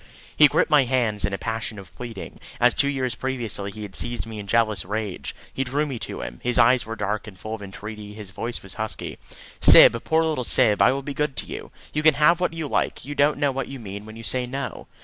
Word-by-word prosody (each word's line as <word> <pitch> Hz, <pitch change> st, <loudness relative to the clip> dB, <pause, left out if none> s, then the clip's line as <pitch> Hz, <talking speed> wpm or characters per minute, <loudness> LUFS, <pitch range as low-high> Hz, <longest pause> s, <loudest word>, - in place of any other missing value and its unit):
He 150 Hz, -, +8 dB
gripped 145 Hz, -, +1 dB
my 145 Hz, -3 st, +6 dB
hands 120 Hz, -5 st, +1 dB
in -, -, -2 dB
a 95 Hz, -, -2 dB
passion 115 Hz, 0 st, -3 dB
of 95 Hz, -2 st, -12 dB
pleading, 115 Hz, -5 st, -8 dB, 0.2 s
as 120 Hz, -1 st, +5 dB
two 140 Hz, -, +2 dB
years 130 Hz, -3 st, -1 dB
previously 120 Hz, -6 st, -3 dB
he 105 Hz, +2 st, -8 dB
had 100 Hz, -2 st, -7 dB
seized 120 Hz, 0 st, -1 dB
me 110 Hz, -1 st, -7 dB
in 100 Hz, -, -8 dB
jealous 110 Hz, -3 st, +2 dB
rage. 105 Hz, 0 st, -4 dB, 0.2 s
He 135 Hz, -, -1 dB
drew 140 Hz, +4 st, 0 dB
me 135 Hz, -5 st, -5 dB
to -, -, -6 dB
him. -, -, -7 dB
His 125 Hz, 0 st, 0 dB
eyes 120 Hz, 0 st, +4 dB
were 115 Hz, -, -4 dB
dark 105 Hz, 0 st, -3 dB
and 100 Hz, -3 st, -11 dB
full 110 Hz, +3 st, -6 dB
of 110 Hz, -, -6 dB
entreaty; 105 Hz, +1 st, -8 dB
his 105 Hz, -3 st, -7 dB
voice 115 Hz, +4 st, -4 dB
was 95 Hz, -1 st, -7 dB
husky. 110 Hz, 0 st, -5 dB, 0.4 s
"Syb, 115 Hz, -, +8 dB
poor 160 Hz, 0 st, +2 dB
little 155 Hz, -5 st, -1 dB
Syb, 105 Hz, -3 st, +4 dB
I 100 Hz, -, +6 dB
will 135 Hz, +1 st, -3 dB
be 145 Hz, -, -5 dB
good 150 Hz, -1 st, -1 dB
to 105 Hz, -3 st, -3 dB
you! -, -, -7 dB, 0.2 s
You 150 Hz, -, 0 dB
can 155 Hz, -1 st, +5 dB
have 165 Hz, +3 st, +4 dB
what 180 Hz, -2 st, 0 dB
you 160 Hz, -2 st, -4 dB
like. -, -, -1 dB
You 145 Hz, -, -5 dB
don't 145 Hz, +1 st, +2 dB
know 145 Hz, -1 st, +1 dB
what 135 Hz, -1 st, -3 dB
you 135 Hz, -, -7 dB
mean 100 Hz, -1 st, -8 dB
when 110 Hz, -, -10 dB
you 115 Hz, -, -9 dB
say 125 Hz, +2 st, +1 dB
no." 135 Hz, -2 st, -5 dB
115 Hz, 250 wpm, -24 LUFS, 105-135 Hz, 0.4 s, He